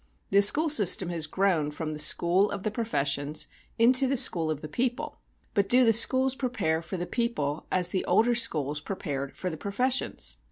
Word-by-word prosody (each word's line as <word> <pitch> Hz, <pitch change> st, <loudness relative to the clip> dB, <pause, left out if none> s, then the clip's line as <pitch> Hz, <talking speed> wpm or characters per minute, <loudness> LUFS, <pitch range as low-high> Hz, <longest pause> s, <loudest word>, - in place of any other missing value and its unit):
The 200 Hz, +1 st, +5 dB
school 295 Hz, +11 st, +5 dB
system 195 Hz, -, +3 dB
has 165 Hz, -3 st, -1 dB
grown 175 Hz, -4 st, 0 dB
from 155 Hz, +1 st, -6 dB
the 150 Hz, -, -7 dB
school 175 Hz, +6 st, +3 dB
of 190 Hz, -, -6 dB
the 215 Hz, -, -2 dB
professions 145 Hz, -, -2 dB, 0.3 s
into 255 Hz, +3 st, +4 dB
the 270 Hz, +1 st, 0 dB
school 170 Hz, -10 st, +3 dB
of 155 Hz, -2 st, -4 dB
the 155 Hz, -, -7 dB
people; 245 Hz, +10 st, -4 dB, 0.3 s
but 200 Hz, -2 st, 0 dB
do 250 Hz, +1 st, +5 dB
the 225 Hz, -, +4 dB
schools 260 Hz, +4 st, +3 dB
prepare 220 Hz, -12 st, -2 dB
for 175 Hz, +3 st, -7 dB
the 175 Hz, -, -4 dB
people 175 Hz, -, -3 dB
as 180 Hz, -1 st, 0 dB
the 185 Hz, -, -2 dB
older 240 Hz, +2 st, +2 dB
schools 150 Hz, -, 0 dB
prepared 145 Hz, -7 st, -6 dB
for 185 Hz, -, -4 dB
the 160 Hz, -, -7 dB
professions? 250 Hz, -, -2 dB
190 Hz, 190 wpm, -26 LUFS, 155-235 Hz, 0.3 s, The